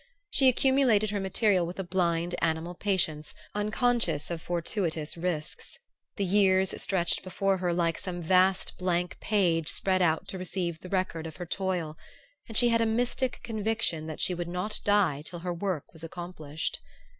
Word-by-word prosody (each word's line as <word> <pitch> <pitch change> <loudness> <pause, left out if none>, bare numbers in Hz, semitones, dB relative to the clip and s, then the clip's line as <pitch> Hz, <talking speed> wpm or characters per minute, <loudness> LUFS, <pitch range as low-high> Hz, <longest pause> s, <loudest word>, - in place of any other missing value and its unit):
She 270 - +4
accumulated 250 -5 +3
her 205 - -1
material 195 -1 +2
with 175 - -7
a 195 - -2
blind 175 -1 0
animal 165 +1 0
patience 170 -6 -1 0.2
unconscious 210 - 0
of 165 -1 -3
fortuitous 170 -2 -1
risks. 165 -3 -4 0.4
The 200 - -1
years 190 0 +3
stretched 180 -3 +1
before 190 +1 0
her 180 -1 0
like 170 -1 0
some 180 -2 -4
vast 185 +2 +2
blank 180 -1 -1
page 175 -7 +2
spread 185 -1 +1
out 160 -2 +2
to 190 - -5
receive 175 -2 -3
the 180 - -10
record 185 -4 -1
of 160 - -9
her 175 - -6
toil; 175 -4 -2 0.5
and 225 - -3
she 240 - +6
had 230 0 +3
a 225 - +3
mystic 245 +3 0
conviction 220 -8 -1
that 155 - -6
she 185 - +3
would 175 -1 -4
not 180 +5 0
die 200 -9 +3
till 175 +3 -5
her 175 0 -2
work 175 -4 -3
was 160 -1 -10
accomplished. 165 -3 -5
180 Hz, 170 wpm, -28 LUFS, 170-200 Hz, 0.5 s, she